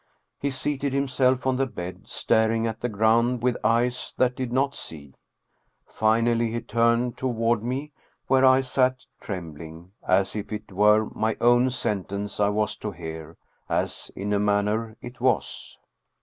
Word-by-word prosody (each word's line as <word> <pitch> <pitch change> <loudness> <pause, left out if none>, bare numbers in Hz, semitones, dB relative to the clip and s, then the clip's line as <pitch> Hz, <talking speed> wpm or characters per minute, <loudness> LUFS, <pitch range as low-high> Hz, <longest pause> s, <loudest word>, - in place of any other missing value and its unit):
He 140 - -1
seated 140 +1 -2
himself 130 -2 +1
on 130 -1 +1
the 135 0 +1
bed, 90 -6 -8
staring 115 0 +1
at 110 -1 -4
the 120 - -1
ground 115 +3 +2
with 125 -1 +2
eyes 120 +2 +1
that 125 -1 +2
did 130 -3 -4
not 135 +2 +1
see. 70 - -8 0.7
Finally 115 +1 +2
he 115 +1 -2
turned 115 +1 +1
toward 115 -3 0
me 130 +6 -3 0.3
where 135 0 +3
I 130 0 +6
sat 130 0 +1
trembling, 85 -2 -8
as 95 +2 +1
if 105 0 -5
it 105 -1 -6
were 105 +3 +4
my 110 0 -1
own 120 +2 +4
sentence 100 -5 -3
I 100 -1 +3
was 105 0 0
to 105 - -4
hear, 80 -2 -8 0.3
as - - -2
in 100 +2 -2
a 100 - +2
manner 105 +2 0
it 120 0 -10
was. 130 -1 -1
115 Hz, 155 wpm, -25 LUFS, 105-125 Hz, 0.7 s, I